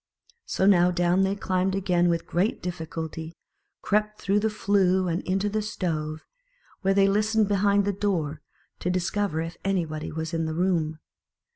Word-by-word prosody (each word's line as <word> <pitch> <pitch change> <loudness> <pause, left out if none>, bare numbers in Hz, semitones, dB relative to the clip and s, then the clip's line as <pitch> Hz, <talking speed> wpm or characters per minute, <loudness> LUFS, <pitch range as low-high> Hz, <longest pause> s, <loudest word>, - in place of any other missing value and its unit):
So 190 - 0
now 180 -3 +5
down 175 +1 +2
they 195 +1 +1
climbed 190 -1 0
again 180 -3 +2
with 165 -1 0
great 185 +6 0
difficulty, 160 -1 -5 0.5
crept 210 +1 0
through 200 +2 +1
the 220 +1 +1
flue 190 -3 +2
and 170 +1 -1
into 195 +2 +1
the 215 +1 -1
stove, 160 -7 -3 0.6
where 195 -1 +2
they 195 0 +5
listened 215 +1 +2
behind 200 0 +2
the 205 - 0
door, 165 -7 -1 0.4
to 180 - -2
discover 185 -1 0
if 165 +1 -6
anybody 165 -6 -2
was 160 +1 -4
in 165 -1 0
the 160 0 -3
room. 165 -3 0
185 Hz, 160 wpm, -26 LUFS, 165-200 Hz, 0.6 s, now